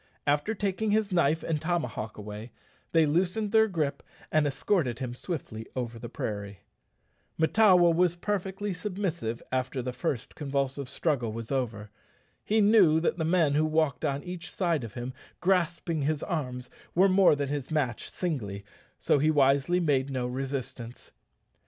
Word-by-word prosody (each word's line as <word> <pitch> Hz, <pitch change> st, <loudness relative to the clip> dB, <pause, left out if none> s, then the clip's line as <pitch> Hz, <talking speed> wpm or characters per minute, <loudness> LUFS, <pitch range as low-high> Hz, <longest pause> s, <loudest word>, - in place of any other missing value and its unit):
After 145 Hz, +10 st, +1 dB
taking 200 Hz, +2 st, -1 dB
his 210 Hz, -1 st, +1 dB
knife 165 Hz, -2 st, +2 dB
and 155 Hz, -3 st, -1 dB
tomahawk 140 Hz, -10 st, -2 dB
away, 105 Hz, +2 st, -8 dB, 0.4 s
they 165 Hz, -1 st, +5 dB
loosened 185 Hz, +7 st, 0 dB
their 220 Hz, 0 st, +5 dB
gripe 150 Hz, -7 st, -2 dB, 0.3 s
and 155 Hz, -1 st, +3 dB
escorted 135 Hz, -, 0 dB
him 125 Hz, -2 st, -4 dB
swiftly 120 Hz, -7 st, -6 dB
over 120 Hz, -2 st, -4 dB
the 120 Hz, -, -7 dB
prairie. 100 Hz, -3 st, -5 dB, 0.8 s
Mahtawa 180 Hz, 0 st, +5 dB
was 175 Hz, 0 st, +3 dB
perfectly 195 Hz, +1 st, -2 dB
submissive 180 Hz, -, -3 dB
after 130 Hz, +1 st, -1 dB
the 125 Hz, 0 st, -3 dB
first 125 Hz, -1 st, -3 dB
convulsive 140 Hz, -2 st, -2 dB
struggle 130 Hz, -5 st, 0 dB
was 115 Hz, +2 st, -6 dB
over. 110 Hz, -6 st, -2 dB, 0.5 s
He 220 Hz, +1 st, +2 dB
knew 200 Hz, -7 st, +6 dB
that 170 Hz, +1 st, 0 dB
the 160 Hz, -, 0 dB
men 165 Hz, -3 st, +3 dB
who 155 Hz, +2 st, +3 dB
walked 155 Hz, -3 st, +1 dB
on 140 Hz, 0 st, -1 dB
each 175 Hz, -1 st, -6 dB
side 170 Hz, -8 st, 0 dB
of 115 Hz, -, -8 dB
him 125 Hz, +1 st, -5 dB, 0.3 s
grasping 175 Hz, -3 st, +1 dB
his 150 Hz, +1 st, 0 dB
arms 125 Hz, -8 st, -4 dB, 0.2 s
were 190 Hz, +3 st, +6 dB
more 190 Hz, -4 st, +5 dB
than 140 Hz, -1 st, -2 dB
his 145 Hz, -2 st, -3 dB
match 145 Hz, -8 st, -1 dB
singly, 105 Hz, -, -3 dB, 0.3 s
so -, -, +2 dB
he 155 Hz, +3 st, +3 dB
wisely 140 Hz, +3 st, +3 dB
made 140 Hz, -5 st, +1 dB
no 130 Hz, -2 st, -2 dB
resistance. 130 Hz, -2 st, -5 dB
150 Hz, 155 wpm, -28 LUFS, 125-180 Hz, 0.8 s, knew